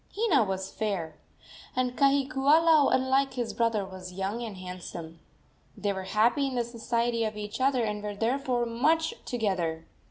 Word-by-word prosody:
Hina 385 - +4
was 190 -1 -3
fair, 180 -8 -3 0.6
and 250 -1 0
Kahikiula, 280 +3 +4
unlike 265 +1 +2
his 240 -3 -2
brother, 230 -4 +1
was 185 -1 -9
young 195 +5 -3
and 220 -5 -6
handsome. 175 -3 -8 0.6
They 205 -1 -1
were 190 -1 -5
happy 235 +8 +2
in 265 - -4
the 240 - +1
society 235 0 -1
of 215 -1 -3
each 210 +3 -5
other, 260 -2 +3
and 210 -1 -2
were 205 0 -4
therefore 245 +2 0
much 315 +8 +1
together. 180 -9 -1
230 Hz, 155 wpm, -28 LUFS, 195-260 Hz, 0.6 s, Hina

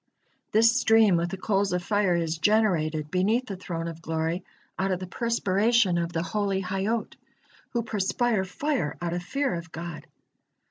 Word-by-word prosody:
This 230 +2 +5
stream 220 -5 +5
with 170 +1 0
the 190 - -5
coals 195 0 0
of 180 0 -1
fire 205 -3 +2
is 165 -1 -1
generated 160 -7 +2
beneath 210 +7 +2
the 200 - -5
Throne 170 -2 -5
of 165 -1 -7
Glory 160 +2 -2 0.4
out 190 +1 +1
of 185 -2 0
the 185 - -5
perspiration 210 -2 +2
of 170 0 -2
the 165 -1 -1
holy 200 0 -1
Hayyot, 195 +5 -2 0.6
who 235 -1 0
perspire 215 0 0
fire 190 - -2
out 170 -1 -2
of 175 - -2
fear 275 +8 -1
of 170 -1 -6
God. 170 -1 -7
190 Hz, 170 wpm, -26 LUFS, 170-220 Hz, 0.6 s, This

